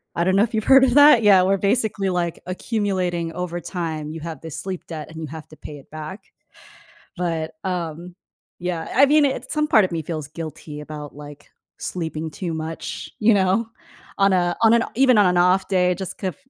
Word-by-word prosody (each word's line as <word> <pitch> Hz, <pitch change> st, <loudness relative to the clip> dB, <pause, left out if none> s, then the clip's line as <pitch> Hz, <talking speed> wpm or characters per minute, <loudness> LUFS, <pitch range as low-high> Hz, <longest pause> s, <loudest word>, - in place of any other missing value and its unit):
I 170 Hz, -, +1 dB
don't 185 Hz, +1 st, +2 dB
know 200 Hz, -, +5 dB
if 235 Hz, -, -3 dB
you've 220 Hz, -1 st, 0 dB
heard 270 Hz, 0 st, +7 dB
of 255 Hz, -2 st, +3 dB
that? 290 Hz, -5 st, +7 dB
Yeah, 195 Hz, -3 st, +6 dB
where 195 Hz, +1 st, +2 dB
basically, 200 Hz, -1 st, 0 dB
like, 175 Hz, -2 st, -2 dB
accumulating 185 Hz, -4 st, -2 dB
over 175 Hz, 0 st, -4 dB
time, 160 Hz, -3 st, -4 dB
you 160 Hz, +1 st, -6 dB
have 160 Hz, -3 st, -7 dB
this 160 Hz, -1 st, -7 dB
sleep 190 Hz, -2 st, -6 dB
debt 155 Hz, -3 st, -6 dB
and 160 Hz, 0 st, -8 dB
you 160 Hz, -, -5 dB
have 160 Hz, +1 st, -9 dB
to 155 Hz, -, -14 dB
pay 150 Hz, 0 st, -9 dB
it 140 Hz, -, -17 dB
back. 155 Hz, +6 st, -8 dB, 0.9 s
But, 165 Hz, -3 st, -2 dB
um, 175 Hz, -1 st, -4 dB, 0.4 s
yeah, 175 Hz, -2 st, -3 dB
I 275 Hz, -, +7 dB
mean, 300 Hz, +2 st, +4 dB
it 270 Hz, -, -3 dB
some 300 Hz, 0 st, 0 dB
part 220 Hz, -9 st, +5 dB
of 185 Hz, -, -6 dB
me 165 Hz, -1 st, -2 dB
feels 155 Hz, -2 st, -5 dB
guilty 155 Hz, -1 st, -8 dB
about, 150 Hz, -1 st, -8 dB
like, 145 Hz, 0 st, -11 dB, 0.3 s
sleeping 160 Hz, -2 st, -4 dB
too 170 Hz, +1 st, -4 dB
much, 160 Hz, +1 st, -6 dB
you 225 Hz, +1 st, +5 dB
know? 195 Hz, +4 st, +2 dB, 0.5 s
On 195 Hz, -1 st, +4 dB
a 175 Hz, -1 st, +1 dB
on 225 Hz, 0 st, +6 dB
an 235 Hz, -1 st, +4 dB
even 255 Hz, -1 st, +4 dB
on 205 Hz, -, +5 dB
an 180 Hz, 0 st, +2 dB
off 180 Hz, +2 st, +3 dB
day 180 Hz, -2 st, +2 dB
just 190 Hz, 0 st, -6 dB
cuf 190 Hz, -3 st, -3 dB
180 Hz, 205 wpm, -22 LUFS, 160-200 Hz, 0.9 s, heard